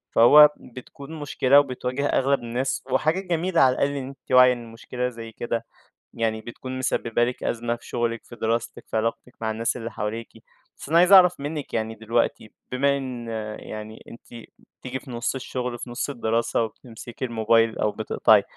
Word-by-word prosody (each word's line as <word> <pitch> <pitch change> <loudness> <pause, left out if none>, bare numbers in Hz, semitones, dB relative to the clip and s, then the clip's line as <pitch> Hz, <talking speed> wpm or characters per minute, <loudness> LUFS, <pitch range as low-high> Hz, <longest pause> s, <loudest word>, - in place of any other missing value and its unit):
فهو 150 +6 +9
بتكون 140 +5 -11
مشكلة 140 -1 +4
وبتواجه 130 0 -2
أغلب 140 0 +2
الناس، 120 +3 -2
وحاجة 155 +7 +2
جميلة 175 -2 0
على 130 -1 +5
الأقل 140 - +1
إن 135 -2 -4
أنتِ 135 -1 -13
واعية 125 0 +7
إن 120 -2 -9
مشكلة 125 +2 -4
زي 115 -1 -9
كده 115 0 -3 0.5
يعني 110 -1 -1
بتكون 130 +3 -7
مسبِّبة 120 -2 0
لِك 125 +1 -3
أزمة 120 0 -1
في 120 - -15
شُغلِك، 120 -1 -2
في - - -12
دراستِك، 115 0 -2
في - - -2
علاقتِك 115 +2 -2
مع 110 -1 -1
الناس 115 +3 -1
اللي 115 0 -6
حواليكِ. 110 +2 -4 0.5
بس - - -10
أنا 165 - +4
عايز 180 +2 +5
أعرف 180 -4 +7
منِّك 145 0 -5
يعني 110 0 -2
دلوقتي، 110 0 -1 0.2
بما 140 +2 +2
إن 125 -4 -6 0.3
يعني 110 +1 -9
أنتِ 115 0 -12 0.3
بتيجي 130 0 -5
في 130 - -12
نُص 120 +2 -2
الشُغل، 125 -2 -4
في 125 - -7
نُص 120 +4 -3
الدراسة 115 -2 0
وبتمسكي 115 +2 -7
الموبايل 115 -1 +2
أو 105 - +1
بتقطعي، - - +3
120 Hz, 175 wpm, -24 LUFS, 115-135 Hz, 0.5 s, فهو